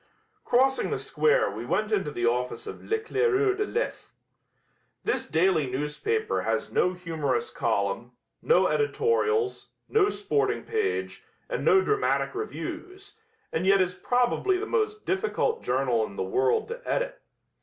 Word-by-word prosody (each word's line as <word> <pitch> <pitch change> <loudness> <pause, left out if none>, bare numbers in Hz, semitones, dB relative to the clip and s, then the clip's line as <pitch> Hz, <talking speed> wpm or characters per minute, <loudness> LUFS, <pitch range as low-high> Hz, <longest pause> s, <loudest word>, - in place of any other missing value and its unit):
Crossing 265 +2 +2
the - - -1
square 475 +2 +2
we - - -6
went 215 0 -1
into 195 -8 +1
the 120 -5 -2
office 125 - -1
of 425 - -8
L'Eclaireur 435 -2 +1
de 420 +1 -1
l'Est. 470 - -3 0.9
This - - -1
daily 160 -3 +2
newspaper 415 - -1
has - - -1
no 180 - +2
humorous 175 - -2
column, - - -1 0.3
no 480 - +4
editorials, 445 -1 +1 0.2
no 415 -2 +3
sporting 420 +1 0
page 435 -3 -2 0.2
and - - -3
no 385 -1 +5
dramatic 425 -1 +1
reviews, 390 -1 -7 0.3
and 160 - -1
yet 195 0 +6
is 185 -1 +1
probably 250 - +1
the 405 - -3
most 430 -2 -1
difficult 440 +4 0
journal 125 -3 +1
in 100 - -12
the - - -2
world 130 +7 +1
to 475 +2 -6
edit. - - -2
390 Hz, 140 wpm, -27 LUFS, -, 0.9 s, yet